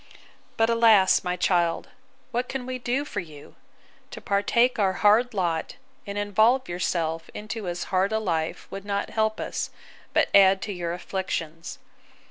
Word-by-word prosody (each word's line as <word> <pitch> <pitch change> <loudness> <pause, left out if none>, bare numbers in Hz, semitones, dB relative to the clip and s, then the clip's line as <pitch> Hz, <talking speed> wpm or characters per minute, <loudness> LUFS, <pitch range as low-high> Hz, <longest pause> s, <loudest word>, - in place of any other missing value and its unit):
But, 225 - +3
alas! 225 -5 +5
my 180 -1 -1
child, 175 -2 +1 0.4
what 245 +2 -2
can 265 -2 -4
we 255 0 -4
do 250 +4 -1
for 205 - -4
you?—To 155 -5 -14
partake 230 +5 +1
our 195 -2 +2
hard 215 +4 +3
lot, 170 -1 -1 0.3
and 200 0 -5
involve 215 +6 +2
yourself 165 -2 -2
into 215 -1 -6
as 175 0 -3
hard 190 +2 +2
a 220 - +1
life, 165 -7 -2
would 195 0 -6
not 200 0 -3
help 220 0 0
us, - - -3 0.4
but - - +2
add 195 -1 +6
to 205 - -4
your 175 -2 -3
afflictions. 170 -3 -4
200 Hz, 150 wpm, -25 LUFS, 175-225 Hz, 0.4 s, add